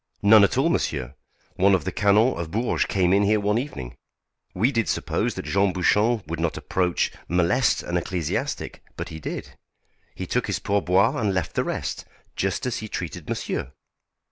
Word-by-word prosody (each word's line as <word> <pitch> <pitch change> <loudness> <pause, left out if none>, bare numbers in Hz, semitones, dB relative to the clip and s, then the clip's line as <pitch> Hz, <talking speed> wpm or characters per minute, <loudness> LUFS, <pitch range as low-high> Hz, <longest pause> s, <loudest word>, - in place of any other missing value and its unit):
"None 105 +1 +8
at 100 - +2
all, 140 +5 +3
monsieur. 65 - -1 0.4
One 95 +1 +5
of 90 - -1
the - - -1
Canons 105 +2 +3
of 85 -2 -4
Bourges 115 +7 0
came 95 -2 +2
in 100 - +4
here 105 +1 +3
one 105 +2 +1
evening. 65 - -6 0.6
We 110 +9 +2
did 115 -5 0
suppose - - -1
that - - -5
Jean 100 -1 +2
Bouchon 105 +4 +2
would 80 +2 -5
not 85 -1 -1
approach, 90 -2 0 0.2
molest 90 +9 +2
an 85 - -1
ecclesiastic, 85 -2 -3 0.2
but - - -5
he 80 - -8
did. - - -6 0.6
He - - -5
took - - -1
his - - -1
pourboire 100 +2 +2
and 100 -3 0
left 90 -4 -2
the - - +1
rest, - - -4 0.3
just 95 +4 -1
as 125 - -1
he 110 - -5
treated 90 -6 -6
monsieur. 65 - -3
100 Hz, 180 wpm, -24 LUFS, 90-110 Hz, 0.6 s, None